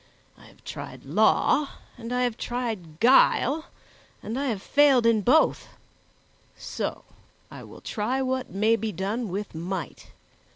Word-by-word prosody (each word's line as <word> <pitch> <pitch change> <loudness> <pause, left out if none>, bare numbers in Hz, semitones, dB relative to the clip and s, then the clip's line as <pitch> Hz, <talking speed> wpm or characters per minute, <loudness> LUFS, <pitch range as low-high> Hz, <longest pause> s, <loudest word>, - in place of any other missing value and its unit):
I - - -18
have - - -21
tried - - -8
law, 295 -2 +2 0.3
and 235 -1 -8
I 250 0 +1
have 245 -3 0
tried 220 -11 -5
guile, 270 +4 +4 0.6
and 230 +5 -4
I 280 - -1
have 215 -6 -3
failed 280 -4 +4
in 230 -2 +4
both; 295 +10 +3 0.9
so - - -5 0.5
I - - -9
will - - -13
try 230 +5 -2
what 260 -1 -2
may 215 +4 +2
be 225 0 -3
done 205 +5 -3
with 200 +3 -5
might." 175 +1 -6
230 Hz, 140 wpm, -25 LUFS, 205-255 Hz, 0.9 s, guile